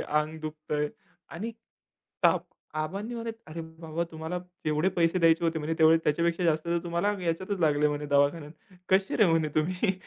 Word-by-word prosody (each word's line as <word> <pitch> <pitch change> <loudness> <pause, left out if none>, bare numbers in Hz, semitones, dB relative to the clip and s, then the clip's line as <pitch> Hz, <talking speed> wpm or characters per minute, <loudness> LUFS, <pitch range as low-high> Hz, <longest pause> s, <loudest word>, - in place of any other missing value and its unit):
अंग 150 +1 -1
दुखतंय 150 -1 -3 0.4
आणि 215 +8 -5 0.7
ताप. - - +4 0.3
आबांनी 195 +10 -3
म्हणे 230 -1 -3 0.2
"अरे 160 +2 -6 0.2
बाबा 165 +1 -2
तुम्हाला 160 +2 -4 0.3
जेवढे 155 +3 +2
पैसे 170 +1 +3
द्यायचे 165 0 +4
होते 165 -1 +1
म्हणे 155 +1 -2
तेवढे 160 0 +7
त्याच्यापेक्षा 170 +3 +1
जास्त 155 -2 +2
तर 170 0 +1
तुम्हाला 170 +4 0
ह्याच्यातच 185 +3 -2
लागले 150 -2 +3
म्हणे 150 0 -3
दवाखान्यात. 145 +2 +2 0.4
कशी 190 +1 +2
रे 215 - +6
म्हणे 165 -2 +2
तुम्ही?" 185 +6 +1
165 Hz, 160 wpm, -28 LUFS, 155-180 Hz, 0.7 s, तेवढे